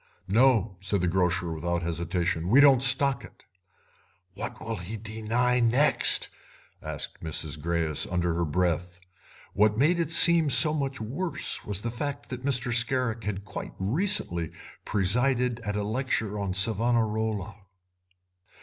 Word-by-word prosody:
"No," 110 -2 +1
said 95 0 -1
the 90 - -1
grocer, 90 0 -1
without 85 +2 -3
hesitation, 85 0 -3
"we 125 +7 +5
don't 140 -3 +5
stock 135 0 +4
it." - - -17 0.9
"What 105 +5 -7
will 115 0 -6
he 90 +6 -7
deny 115 +3 -2
next?" 125 +6 +4 0.5
asked - - -5
Mrs. 80 -1 -2
Greyes 80 -2 -1
under 90 -1 -1
her 85 +1 -2
breath. 90 +2 -2 0.5
What 105 +1 +1
made 160 +7 +1
it 165 -3 -2
seem 165 -1 +7
so 150 +2 +6
much 140 -3 -4
worse 140 +12 -2
was 100 -1 -1
the 115 - -3
fact 145 +3 -6
that 125 0 -8
Mr. 125 -2 0
Scarrick 115 -2 +1
had 100 -1 -5
quite 100 - -8
recently 95 - -2 0.4
presided 120 +5 0
at 105 -3 -5
a 105 - -2
lecture 110 -2 -3
on 95 -2 -4
Savonarola. 110 -1 -1
110 Hz, 140 wpm, -26 LUFS, 90-125 Hz, 0.9 s, seem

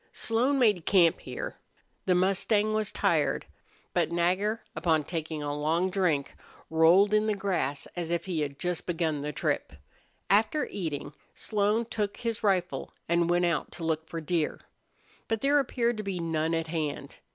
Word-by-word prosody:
Slone 245 +5 +3
made 210 -10 +3
camp 175 -4 +5
here. - - -6 0.5
The 180 - +4
mustang 200 +3 +2
was 215 -2 0
tired. - - +1 0.5
But - - +1
Nagger, 185 +6 +1
upon 160 -3 +2
taking 155 -1 -4
a 145 0 -2
long 165 +5 +1
drink, 175 -8 0 0.4
rolled 170 +6 +5
in 215 0 +3
the 215 - +1
grass 185 -8 -1
as 175 -2 -3
if 170 -1 -1
he 180 -4 -2
had 140 -2 -3
just 175 +1 -2
begun 160 -4 -1
the 150 +1 -3
trip. 140 - -2 0.5
After 220 +10 +3
eating, 150 -6 -4 0.2
Slone 215 +2 0
took 210 -3 -3
his 230 -2 -3
rifle 185 -9 0
and 170 0 +2
went 175 0 +3
out 170 -2 -1
to 170 - -7
look 160 0 -1
for 165 - -4
deer. 160 0 -1 0.7
But 225 -1 -1
there 285 +1 +4
appeared 240 -3 0
to 215 - -3
be 195 -3 -3
none 165 -1 0
at 165 0 -1
hand. 155 -3 -4
175 Hz, 165 wpm, -28 LUFS, 160-210 Hz, 0.7 s, camp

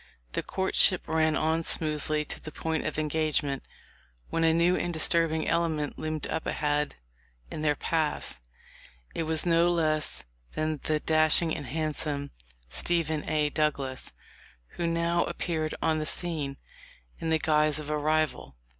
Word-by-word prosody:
The - - -1
courtship 190 -1 +2
ran 160 -1 +2
on 160 +1 +1
smoothly 155 -1 0
to - - -6
the 155 - -8
point 160 0 -2
of - - -4
engagement, 150 -3 0 0.7
when 165 - +1
a 165 - +5
new 170 +2 +3
and 175 - -1
disturb 165 0 +2
ing 160 0 -1
element 160 -3 0
loomed 155 -1 -3
up - - -3
ahead 150 -1 0 0.6
in - - -4
their 150 -1 +2
paths. 155 - -1 0.7
It - - -2
was 160 0 +1
no 170 0 +4
less 155 -3 +1 0.3
than 155 -1 -1
the 155 -1 +1
dashing 155 +1 +4
and 140 - -6
handsome 150 0 -2 0.4
Stephen 160 - 0
A. 150 -1 +1
Douglas, 140 -4 -1 0.6
who 170 - -3
now 170 +1 +1
appeared 155 -3 -2
on 160 -1 +2
the 155 - -2
scene 150 -6 -2 0.6
in 165 - -2
the 160 - +4
guise 155 -1 +2
of 150 -1 -4
a 150 - +1
rival. 155 - 0
155 Hz, 150 wpm, -28 LUFS, 150-165 Hz, 0.7 s, a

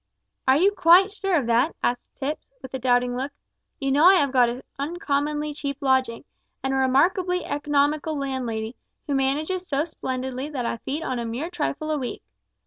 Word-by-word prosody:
"Are 260 +1 +6
you 385 +6 +4
quite 365 +1 +6
sure 390 -2 -1
of 285 -7 +1
that?" 235 +7 +2
asked 245 0 -1
Tipps, 290 +3 -4
with 260 - -9
a 265 - -2
doubting 245 0 +2
look. 265 +3 -3 0.5
"You 275 -2 -1
know 285 +3 +4
I 380 +2 +9
have 285 -7 +2
got 250 -2 +4
an 245 +2 -6 0.2
uncommonly 295 -1 -1
cheap 280 -1 -4
lodging, 260 -4 +1 0.4
and 265 0 0
a - - +1
remarkably 355 +8 +2
economical 295 +1 0
landlady, 250 -4 -3 0.3
who 285 - -2
manages 305 +7 0
so 280 +1 +1
splendidly 260 -3 -4
that 260 -5 -3
I 230 - -2
feed 290 +7 -4
on 255 -5 -2
a 235 - -3
mere 250 +10 -4
trifle 310 -2 -2
a 305 - 0
week. 250 - -5
280 Hz, 185 wpm, -24 LUFS, 260-310 Hz, 0.5 s, I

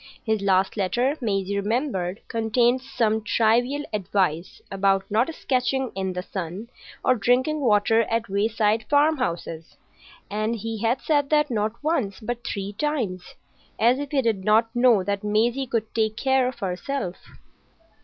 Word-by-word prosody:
His 220 -2 0
last 190 +1 +2
letter, 245 +8 +1
Maisie 200 -3 -1
remembered, 205 -4 -2
contained 235 +3 +1
some 220 -4 0
trivial 240 +6 +2
advice 185 -4 -1
about 195 0 +2
not 230 +9 +2
sketching 260 0 -1
in 190 -1 -3
the 180 0 -4
sun 190 +5 -6 0.3
or 255 - +5
drinking 250 +7 +1
water 225 -2 +3
at 230 0 -1
wayside 215 +2 +1
farmhouses; 255 - 0 0.5
and 215 +2 -1
he 225 0 -5
had 235 +3 +1
said 290 -3 +1
that 300 -2 +2
not 215 -1 0
once, 260 - -1
but 240 +1 -5
three 200 -2 -4
times,—as 235 -1 -2
if 285 -1 -4
he 275 -2 +1
did 220 -5 0
not 225 +3 +3
know 240 -5 +4
that 200 +1 -2
Maisie 235 +6 +1
could 225 -2 -2
take 220 -1 0
care 265 0 +2
of 255 - -5
herself. 190 +1 -3
225 Hz, 145 wpm, -24 LUFS, 200-255 Hz, 0.5 s, or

